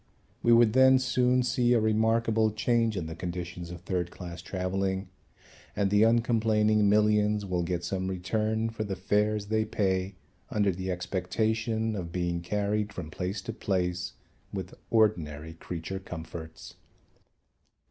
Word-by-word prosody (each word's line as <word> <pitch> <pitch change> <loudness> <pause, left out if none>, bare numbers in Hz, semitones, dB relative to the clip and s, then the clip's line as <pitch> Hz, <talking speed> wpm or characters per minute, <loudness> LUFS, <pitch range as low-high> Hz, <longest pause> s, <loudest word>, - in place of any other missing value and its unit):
We 120 - +3
would 115 -2 +6
then 130 +1 +7
soon 125 -1 +2
see 125 0 +2
a 120 - +4
remarkable 110 0 +2
change 115 0 +1
in 85 - -2
the 80 - -5
conditions 85 0 -5
of 85 -1 -8
third 90 -1 -2
class 85 -1 -8
travelling 95 +1 -2 0.7
and 100 -1 +1
the 105 0 +4
uncomplaining 110 -2 +3
millions 105 0 +3
will 90 -2 -1
get 85 0 -2
some 95 +1 -2
return 110 +4 -1
for 110 -1 -3
the 100 -2 -3
fares 105 +2 +1
they 110 +1 +1
pay 95 -3 -1 0.3
under 100 -2 +2
the 95 +1 -5
expectation 110 +5 -1
of 85 -4 -5
being 85 -1 -1
carried 105 +3 -1
from 85 -7 -7
place 95 +3 -4
to - - -5
place 90 -2 -1 0.4
with 95 -2 -5 0.2
ordinary 80 -9 +1
creature 85 +3 -6
comforts. 80 -3 -9
100 Hz, 140 wpm, -28 LUFS, 90-110 Hz, 0.7 s, then